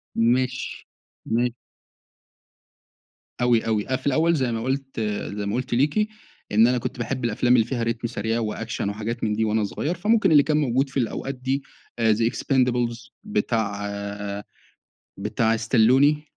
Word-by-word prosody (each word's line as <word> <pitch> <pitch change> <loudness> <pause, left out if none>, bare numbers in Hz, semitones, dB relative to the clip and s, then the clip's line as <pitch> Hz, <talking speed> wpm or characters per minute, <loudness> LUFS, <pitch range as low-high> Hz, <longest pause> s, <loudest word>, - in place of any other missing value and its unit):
ماشي، 125 +2 0 0.4
ما 120 +2 +1 1.9
أوي، 120 -2 +3
أوي، 110 -2 0
أنا 130 - 0
في - - -6
الأوّل 160 +5 +3
زي 130 -4 0
ما 115 0 -2
قلت 135 -1 -3 0.4
زي 100 - -2
ما 100 +3 -1
قلت 125 -1 -2
ليكِ 150 - +2 0.4
إن 110 +3 +6
أنا 125 0 +2
كنت 120 - -4
باحب 125 +1 -2
الأفلام 120 +2 +3
اللي 115 -2 +4
فيها 120 -2 -2
ريتم 115 0 -1
سريع 115 0 -2
وأكشن 110 -2 -3
وحاجات 110 +3 -4
من 105 -1 +1
دي 110 0 +1
وأنا 110 0 +1
صغيّر، 150 - -2
فممكن 210 0 +2
اللي 145 -2 +7
كان 150 -1 +1
موجود 135 -1 +1
في 135 - -5
الأوقات 135 +3 -2
دي 135 +2 -2 0.4
آآ 110 -1 +4
the 115 +2 +1
expendables 125 -3 0
بتاع 110 - -1 1.3
بتاع 115 0 +1
ستالون، 130 +6 +4
120 Hz, 155 wpm, -24 LUFS, 115-135 Hz, 1.9 s, اللي